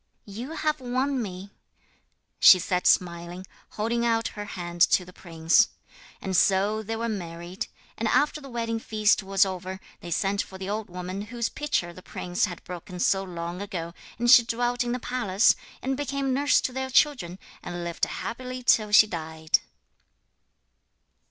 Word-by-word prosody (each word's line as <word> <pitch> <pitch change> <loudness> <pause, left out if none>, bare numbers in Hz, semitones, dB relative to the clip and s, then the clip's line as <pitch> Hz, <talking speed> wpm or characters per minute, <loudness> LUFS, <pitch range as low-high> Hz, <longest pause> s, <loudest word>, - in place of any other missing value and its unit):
'You 230 +9 -7
have 305 -1 -1
won 255 +2 -1
me,' 195 -1 -7 0.9
she 185 - +9
said 180 0 -1
smiling, 175 +1 +1 0.3
holding 230 +2 -1
out 230 -1 +1
her 205 -1 -7
hand 175 -4 -7
to 180 - +3
the 180 - -14
prince. 165 +5 +2 0.5
And 190 -1 -3
so 200 +4 +3
they 225 +1 -4
were 230 +1 -2
married: 175 -3 -5 0.3
and - - 0
after 300 +1 +2
the 275 - -10
wedding 230 -2 -2
feast 215 -2 +2
was 195 0 +3
over 185 0 -5 0.2
they 175 - -9
sent 195 +4 0
for 190 - -9
the 190 0 -6
old 210 0 -3
woman 180 +2 -5
whose 235 +1 -3
pitcher 290 -13 -2
the 185 - -12
prince 180 0 -2
had 180 -4 -8
broken 180 0 -8
so 190 +2 +2
long 175 0 -6
ago, 175 -5 -5 0.2
and 240 +1 -1
she 240 - +9
dwelt 245 +2 -1
in 240 - -3
the 250 - 0
palace, 235 -5 +2 0.3
and 265 +1 0
became 275 -1 -2
nurse 285 +2 +3
to 255 - -3
their 265 0 -3
children, 245 - +2 0.2
and 175 0 -6
lived 170 0 -1
happily 255 +1 -6
till 215 -3 +3
she 210 +1 +8
died. 160 -4 -1
200 Hz, 165 wpm, -26 LUFS, 180-240 Hz, 0.9 s, she